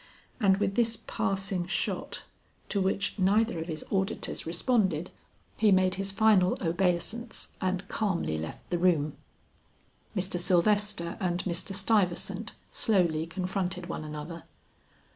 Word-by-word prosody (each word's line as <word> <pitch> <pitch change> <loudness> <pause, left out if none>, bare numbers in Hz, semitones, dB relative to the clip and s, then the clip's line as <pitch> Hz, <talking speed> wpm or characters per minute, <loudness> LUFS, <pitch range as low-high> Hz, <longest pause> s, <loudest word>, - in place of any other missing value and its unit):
And 195 -4 +4
with 200 -1 0
this 230 +1 +2
passing 195 -2 -1
shot, 190 - -2 0.5
to 200 - 0
which 195 +2 0
neither 200 0 +3
of 160 - -4
his 155 -2 -5
auditors 190 -3 -2
responded, 180 - +1 0.5
he 215 -1 +4
made 185 -1 +4
his 195 +1 -2
final 195 -3 +4
obeisance 185 +7 0
and 185 0 -1
calmly 175 - -1
left 80 +1 -7
the 175 - +1
room. 160 -5 +2 1.0
Mr. 185 -1 +1
Sylvester 190 0 +2
and 180 -2 0
Mr. 185 +2 -2
Stuyvesant 195 +1 +1 0.2
slowly 170 -7 +2
confronted 180 0 -3
one 160 - -4
another. 155 +2 -7
185 Hz, 125 wpm, -29 LUFS, 175-200 Hz, 1.0 s, And